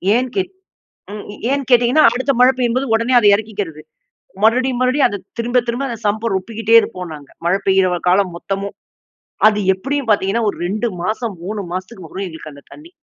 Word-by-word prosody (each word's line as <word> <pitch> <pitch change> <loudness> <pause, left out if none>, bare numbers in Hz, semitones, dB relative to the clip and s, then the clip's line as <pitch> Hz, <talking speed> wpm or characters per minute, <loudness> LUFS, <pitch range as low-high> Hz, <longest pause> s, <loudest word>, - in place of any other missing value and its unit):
ஏன் 255 +1 0
கேட் 375 -1 -1 0.6
ம் 210 - -7 0.3
ஏன் 280 0 0
கேட்டீங்கன்னா, 245 +5 +5
அடுத்த 260 +3 0
மழை 250 +1 +7
பெய்யும்போது 255 +2 0
உடனே 235 +3 +1
அதை 210 -3 +5
இறக்கிக்கிறது. 200 -7 -5 0.6
மறுபடியும் 250 +2 +2
மறுபடியும் 260 +2 +3
அதை 205 - -5 0.2
திரும்ப 245 +1 +1
திரும்ப 245 +4 -2
அந்த 230 -2 -5
சம்பை 220 +3 -1
ரொப்பிக்கிட்டே 225 +3 0
இருப்போம் 180 -6 -6
நாங்க. 145 -2 -14 0.2
மழை 190 +3 +2
பெய்யுற 185 -2 +3
காலம் 185 -1 +2
மொத்தமும். 195 +2 -4 0.7
அது 210 -1 0 0.2
எப்படியும் 270 +4 -3
பார்த்தீங்கன்னா, 210 +2 +1
ஒரு - - -13
2 215 +4 -1 0.2
மாசம் 220 +1 -2
3 210 +3 -4
மாசத்துக்கு 185 0 -6
வரும் 195 +4 -5
எங்களுக்கு 160 -2 -10
அந்த 140 - -15
தண்ணி. 325 +3 -13
220 Hz, 170 wpm, -18 LUFS, 195-250 Hz, 0.7 s, மழை